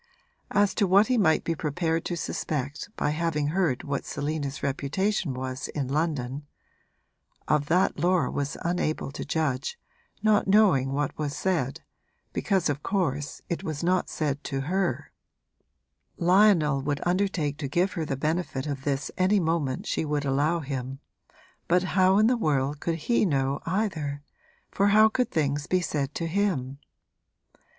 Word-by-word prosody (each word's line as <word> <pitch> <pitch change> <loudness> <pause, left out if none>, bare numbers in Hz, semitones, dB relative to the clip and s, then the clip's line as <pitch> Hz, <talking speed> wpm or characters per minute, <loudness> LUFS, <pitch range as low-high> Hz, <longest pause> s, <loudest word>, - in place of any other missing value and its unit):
As 205 0 +2
to 200 - +2
what 200 +5 +5
he 255 - +3
might 160 -6 +3
be 165 - 0
prepared 165 +2 -1
to 175 - -2
suspect 145 -1 -3
by 150 - +1
having 150 -2 0
heard 165 -6 0
what 140 -2 -2
Selina's 145 -1 -3
reputation 145 +3 -1
was 130 0 -4
in 140 -3 -3
London, 145 -2 -2 1.0
of 150 -1 +2
that 180 +1 +2
Laura 180 +2 +2
was 140 0 -3
unable 170 -5 -1
to - - -6
judge, 155 - -1 0.5
not 215 -2 +3
knowing 190 -11 +4
what 145 +1 -1
was 145 -2 -2
said, 160 -9 -1 0.5
because 190 -4 +1
of 145 -1 -2
course 145 -8 -2
it 170 - -3
was 155 0 -4
not 180 +1 +1
said 145 -2 -2
to 135 0 -2
her. 185 +7 -1 1.1
Lionel 175 -6 +4
would 145 +1 -2
undertake 175 -5 0
to 145 - -2
give 175 +8 +1
her 165 - -2
the 140 -3 -3
benefit 155 -2 -1
of 140 -2 -4
this 140 0 -1
any 190 +3 +4
moment 160 -6 -1
she - - -1
would 150 -1 -1
allow 145 +5 +1
him, 135 -2 -4 0.7
but 180 +1 +3
how 185 +1 +3
in 215 - +5
the 250 +2 +4
world 145 - 0
could 165 +1 -1
he 220 +10 +1
know 140 -6 0
either, 160 -7 -2 0.5
for 200 - +2
how 215 +2 +6
could 250 +3 0
things 145 -2 -1
be 185 - +2
said 145 -5 -2
to 165 - -2
him? 165 -8 -1
155 Hz, 155 wpm, -27 LUFS, 140-185 Hz, 1.1 s, how